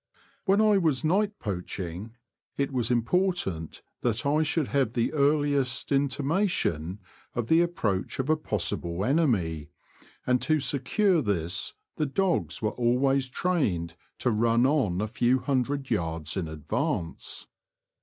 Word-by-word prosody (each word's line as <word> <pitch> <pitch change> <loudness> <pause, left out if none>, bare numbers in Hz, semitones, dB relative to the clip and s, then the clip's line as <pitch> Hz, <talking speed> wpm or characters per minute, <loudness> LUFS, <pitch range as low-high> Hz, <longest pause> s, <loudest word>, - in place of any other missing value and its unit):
When 200 +1 +4
I 210 -2 +5
was 160 -5 +1
night 200 +6 +1
poaching, 95 - -5 0.4
it 140 0 0
was 125 -3 0
important 120 - 0 0.2
that 120 0 -1
I 150 +2 +3
should 155 -1 0
have 135 -5 +1
the 120 -2 0
earliest 145 -3 +1
inti 140 0 +1
mation 135 - 0 0.4
of 120 -2 -2
the 165 +1 +6
approach 110 - -1
of 130 - -1
a 155 - +4
possible 90 - -2
enemy, 100 - +1 0.6
and 125 0 +2
to 155 -1 +2
secure 160 - +1
this 90 - -2 0.2
the 155 - 0
dogs 135 - 0
were 105 - +1
always 130 +2 +1
trained 125 - -1 0.2
to 125 - 0
run 115 +2 +3
on 130 - +1
a 110 - -1
few 120 +3 +2
hundred 135 0 -1
yards 80 -5 -1
in 95 -4 -2
advance. 80 +2 -3
125 Hz, 135 wpm, -27 LUFS, 100-150 Hz, 0.6 s, the